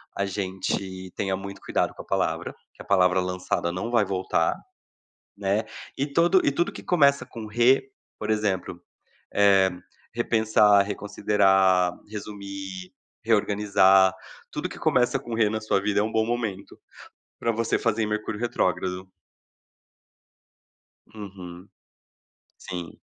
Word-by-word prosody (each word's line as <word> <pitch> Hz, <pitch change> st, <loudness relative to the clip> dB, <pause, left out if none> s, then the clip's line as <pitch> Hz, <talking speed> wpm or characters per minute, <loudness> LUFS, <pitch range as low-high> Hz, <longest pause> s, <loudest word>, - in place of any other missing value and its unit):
a 100 Hz, -, -1 dB
gente 95 Hz, -1 st, -4 dB
tenha 95 Hz, -1 st, -1 dB
muito 100 Hz, +1 st, -8 dB
cuidado -, -, -1 dB
com -, -, -9 dB
a -, -, -15 dB
palavra, -, -, -1 dB, 0.2 s
que -, -, -13 dB
a -, -, -12 dB
palavra 95 Hz, -1 st, +3 dB
lançada 90 Hz, -1 st, -2 dB
não 95 Hz, +6 st, -4 dB
vai 115 Hz, -4 st, +3 dB
voltar, 95 Hz, -3 st, 0 dB, 0.8 s
né, 100 Hz, +2 st, 0 dB, 0.3 s
e 140 Hz, -, 0 dB
todo 170 Hz, +5 st, +3 dB
e 140 Hz, -, +3 dB
tudo 170 Hz, +5 st, 0 dB
que -, -, -9 dB
começa 140 Hz, -6 st, +3 dB
com 115 Hz, -3 st, -9 dB
re, 125 Hz, +5 st, +3 dB, 0.3 s
por 105 Hz, -, -5 dB
exemplo: 95 Hz, -5 st, -1 dB, 0.5 s
Eh, 100 Hz, -2 st, +5 dB, 0.4 s
repensar, 110 Hz, -3 st, +4 dB
reconsiderar, 95 Hz, -3 st, +2 dB, 0.2 s
resumir, 100 Hz, -3 st, -7 dB, 0.3 s
reorganizar, 100 Hz, -3 st, +4 dB, 0.4 s
tudo -, -, -4 dB
que -, -, -10 dB
começa 125 Hz, -1 st, +2 dB
com 120 Hz, -, -8 dB
re, 110 Hz, -2 st, +3 dB
na 110 Hz, 0 st, -2 dB
sua 110 Hz, -2 st, 0 dB
vida, 105 Hz, 0 st, +1 dB
é -, -, +2 dB
um 110 Hz, -, -3 dB
bom 110 Hz, 0 st, +1 dB
momento, 115 Hz, -5 st, -4 dB, 0.6 s
pra 115 Hz, -, +1 dB
você 115 Hz, 0 st, 0 dB
fazer 115 Hz, -1 st, 0 dB
em -, -, -1 dB
Mercúrio 105 Hz, 0 st, -3 dB
retrógrado. 95 Hz, -4 st, -1 dB, 2.0 s
Uhum. 95 Hz, -4 st, -10 dB, 0.9 s
Sim. 90 Hz, -2 st, -7 dB
100 Hz, 130 wpm, -25 LUFS, 95-110 Hz, 2.0 s, Eh